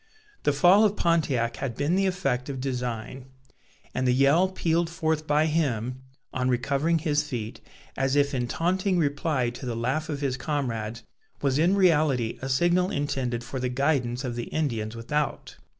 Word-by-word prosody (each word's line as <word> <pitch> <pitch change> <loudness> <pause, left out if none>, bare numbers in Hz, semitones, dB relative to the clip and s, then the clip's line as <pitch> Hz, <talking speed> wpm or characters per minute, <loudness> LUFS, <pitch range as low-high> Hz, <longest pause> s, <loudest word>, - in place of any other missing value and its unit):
The - - +2
fall 175 +9 +5
of 210 -1 +3
Pontiac 140 -9 +1
had 130 -5 -3
been 145 +5 +1
the 195 0 +2
effect 165 -9 -1
of 135 -2 -4
design; 125 -1 -4 0.7
and 130 0 0
the - - +4
yell 140 +8 +4
pealed 170 -2 0
forth 160 -2 -1
by 150 +1 +3
him, 130 -6 -1 0.3
on 130 0 0
recovering 140 +6 +1
his 150 -2 +1
feet, 120 -7 -5 0.3
as 135 +1 0
if 145 0 +2
in 125 -2 -1
taunting 185 +6 0
reply 145 -5 0
to 120 - -10
the 120 - -2
laugh 130 +8 -1
of 145 -2 -3
his 135 -2 -1
comrades, 115 -6 -3 0.4
was 135 0 +2
in 175 +5 +4
reality 150 - +2
a 135 - -4
signal 175 +7 +2
intended 130 -6 -2
for 130 +2 -5
the 125 0 -1
guidance 125 -2 0
of 125 -2 -3
the 120 - -3
Indians 115 -8 -2
without. 140 +4 -3
140 Hz, 170 wpm, -26 LUFS, 125-160 Hz, 0.7 s, fall